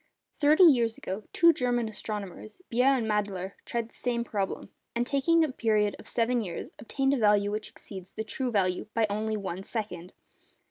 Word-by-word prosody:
Thirty 305 +5 +5
years 240 -9 +5
ago, 195 +3 -5
two 335 0 +6
German 245 -4 0
astronomers, 210 -1 -6
Beer 250 +3 +3
and 265 -4 +3
Madler, 200 -3 -1
tried 235 -1 -3
the - - -26
same 240 -1 -1
problem, 200 -4 -3 0.3
and 240 +1 +1
taking 305 +5 +3
a 310 - 0
period 215 -4 +1
of - - -12
seven 240 +1 +1
years, 175 -5 -6
obtained 270 +3 0
a - - +2
value 205 -2 +3
which 215 +1 -4
exceeds 190 -2 -10
the 220 - -4
true 255 +3 -3
value 190 -3 0
by 225 -1 +3
only 215 +1 -1
one 190 -2 -4
second. 195 -5 -5
220 Hz, 180 wpm, -28 LUFS, 205-245 Hz, 0.3 s, two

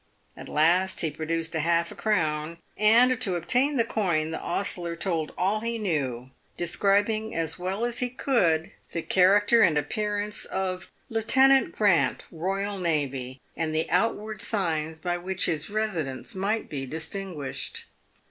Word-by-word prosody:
At - - -10
last 175 +5 +2
he 160 - 0
produced 160 +2 -3
half 170 +1 +1
a - - -9
crown, 165 -6 -1 0.2
and, 235 +4 +4
to 185 -3 +1
obtain 260 - +1
the 230 - +4
coin, 170 -9 0
the 160 - -3
ostler 175 -2 -2
told 165 -3 -2
all 195 +4 +1
he 230 +1 -2
knew, 135 - -2 0.3
describing 205 +5 +1
as 165 0 -2
well 190 +5 -2
as 240 0 -1
he 250 - 0
could 180 - +1 0.2
the 170 - -2
character 205 +5 +4
and 165 -7 +4
appearance 210 +5 -2
of 185 -1 -3 0.2
Lieutenant 265 +4 +4
Grant, 200 -6 +2
E.jST., 165 -8 -2 0.2
and 160 -1 -2
the 160 - +1
outward 215 -2 0
signs 160 -7 -1
by 175 +1 -2
which 190 +1 0
his 160 -2 -1
residence 180 -11 -2
might 200 +4 -1
be 135 -3 -4
distinguished. 160 -1 -4
180 Hz, 140 wpm, -26 LUFS, 160-215 Hz, 0.3 s, and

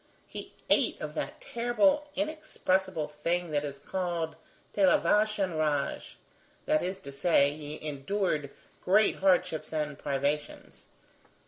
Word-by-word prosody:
He - - -8 0.2
ate - - +3
of - - -5
that - - -4
terrible, 285 - +2
inexpressible 190 - -1
thing 170 +3 -2
that 145 -1 +1
is 140 -1 -5
called 170 0 -3 0.4
de 200 - +1
la - - +6
vache 210 +4 +2
enragé; 155 -7 -1 0.5
that 310 0 +3
is 185 +1 -2
to 140 - -8
say, 140 0 +3
he 150 0 -7
endured 150 +1 -1 0.3
great 205 +3 +4
hardships 180 -4 +2
and 150 -2 -2
privations. 145 +1 -3
170 Hz, 125 wpm, -29 LUFS, 150-200 Hz, 0.5 s, la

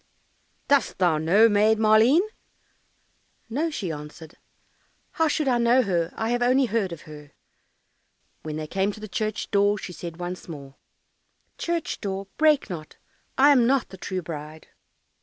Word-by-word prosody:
"Dost 285 -1 +2
thou 175 -4 +2
know 195 +8 +5
Maid 215 +1 +3
Maleen?" 220 +8 +5 1.3
"No," 305 +8 0
she 200 - -4
answered, 150 +1 -9 0.8
"how 320 - +1
should 305 -1 0
I 245 -2 +2
know 240 +2 +4
her; 175 -5 -1
I 225 0 -2
have 245 0 0
only 255 +2 +3
heard 220 -5 -1
of 170 - -8
her." 150 -1 -13 1.1
When 155 -1 -6
they 155 0 -4
came 190 +5 -1
to 215 - -11
the 215 - -7
church 215 +1 -3
door, 205 0 +3
she 180 - -7
said 170 -1 -8
once 180 +1 -6
more, 140 -5 -9 0.9
"Church 340 -1 -3
door, 195 -1 -4
break 310 -2 +4
not, 165 -6 -8 0.4
I 280 +2 +6
am 250 -4 +4
not 270 0 +1
the 190 - -11
true 185 0 -4
bride." 155 -1 -8
205 Hz, 160 wpm, -25 LUFS, 170-245 Hz, 1.3 s, I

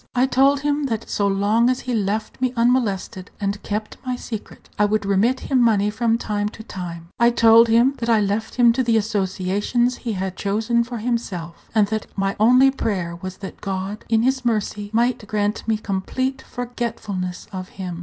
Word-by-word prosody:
I 250 +1 +4
told 275 +2 +3
him 290 0 0
that 230 -4 -3
so 200 - 0
long 205 +5 +2
as 255 0 0
he 250 - -3
left 215 +2 -2
me 255 -1 +1
unmolested, 225 -6 0
and 200 0 -2
kept 215 +1 -4
my 255 -1 -2
secret, 225 -3 -8
I 210 - +5
would 210 0 0
remit 200 +6 +2
him 265 -3 +1
money 210 -3 +3
from 225 +1 +1
time 210 -2 -2
to 220 - -11
time. 170 -5 -7
I 235 0 +6
told 230 -1 +6
him 235 +4 +4
that 235 0 -2
I 225 -2 +5
left 210 +2 -1
him 240 -2 +5
to 260 - 0
the 230 -2 +2
associations 205 +3 0
he 230 -3 -4
had 190 -1 -3
chosen 220 +4 0
for 240 0 -6
himself, 210 -8 -4
and 215 -2 +5
that 220 -1 -2
my 195 0 -1
only 250 +5 +6
prayer 185 -10 -2
was 185 +1 -7
that - - -10
God, 195 +1 -4
in 225 0 +3
His 260 +1 +1
mercy, 210 -3 -1
might 235 0 +1
grant 210 +1 -1
me 220 -1 +2
complete 260 +7 -2
forgetfulness 220 -7 -4
of 185 -1 -6
him. 180 -3 -6
220 Hz, 190 wpm, -22 LUFS, 200-240 Hz, -, I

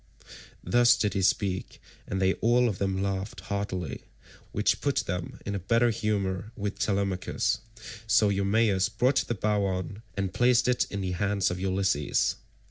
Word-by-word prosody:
Thus 120 0 +4
did 105 -3 0
he 100 - 0
speak, 95 0 0 0.3
and 95 - -2
they 95 0 +3
all 120 +2 +4
of 105 -5 -3
them 95 -1 0
laughed 100 0 -3
heartily, 95 -3 -4 0.5
which - - +1
put - - 0
them 90 -1 -4
in 100 - -3
a 100 - -2
better 115 +5 +2
humour 105 -2 -2
with 100 -1 -4
Telemachus; 95 -3 0 0.5
so 105 -1 +4
Eumaeus 100 0 +2
brought 125 +5 +1
the 120 - -1
bow 105 0 0
on 95 +2 -3 0.2
and 95 -2 -2
placed 120 0 +3
it 125 -1 +2
in 100 - -4
the 95 -1 -2
hands 100 +1 0
of 90 - -4
Ulysses. 95 -6 +1
100 Hz, 160 wpm, -28 LUFS, 95-110 Hz, 0.5 s, Thus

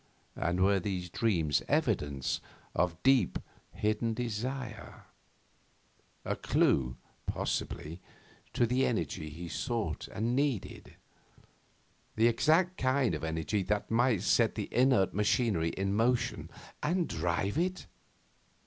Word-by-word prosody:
And 90 +2 0
were 100 0 +4
these 90 -2 -3
dreams 85 - +1
evidence 70 -3 0 0.3
of 90 -1 -1
deep, 130 -8 +4 0.3
hidden 110 +2 0
desire 120 +1 -4 1.2
a - - -1
clue, 60 -2 +1 0.3
possibly, 80 +4 -3 0.5
to 120 - +3
the 125 +3 +1
energy 80 - -2
he 85 +4 -7
sought 110 - -3
and 115 +4 -1
needed, 135 -7 -2 1.2
the 110 - +3
exact 160 +10 +3
kind 130 -1 +2
of - - -4
energy 80 +5 -1
that 105 +3 -1
might 115 -4 +3
set 110 +3 +3
the 105 - -5
inert 125 -6 +3
machinery 105 -4 +2
in 95 +3 -2
motion 115 +3 +1 0.3
and 175 +2 +1
drive 95 - -1
it? 185 +2 -1
105 Hz, 115 wpm, -31 LUFS, 90-125 Hz, 1.2 s, were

